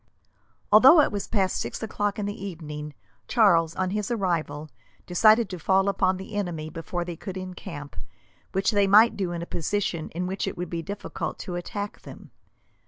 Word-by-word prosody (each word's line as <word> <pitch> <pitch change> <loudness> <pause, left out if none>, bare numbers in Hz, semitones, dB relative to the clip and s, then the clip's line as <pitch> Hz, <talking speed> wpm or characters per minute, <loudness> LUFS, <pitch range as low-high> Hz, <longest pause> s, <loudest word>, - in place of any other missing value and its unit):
Although 260 +10 +8
it - - +1
was 205 -1 -3
past 190 -4 0
six - - -5
o'clock 205 -2 -2
in 210 - -2
the 205 -1 -5
evening, 150 -5 -7 0.3
Charles, 170 -8 +4
on 185 -1 -1
his 210 -1 -2
arrival, 170 -9 -1 0.4
decided 215 +5 +5
to 180 - -5
fall 190 +4 +2
upon 190 -2 +2
the 190 +3 -9
enemy 170 -6 -3
before 175 +1 -4
they 175 -1 -5
could 190 +3 -7
encamp, 180 -5 -8 0.6
which 195 +4 +1
they 205 -2 +3
might 215 +4 +6
do 190 -3 -2
in 170 -1 -4
a - - -5
position 170 -1 -2
in 180 +1 -2
which 190 +1 -3
it - - -4
would 175 -1 -5
be 170 -1 -2
difficult 200 +5 -5
to 180 - -5
attack 200 +4 -5
them. - - -12
190 Hz, 180 wpm, -26 LUFS, 170-205 Hz, 0.6 s, Although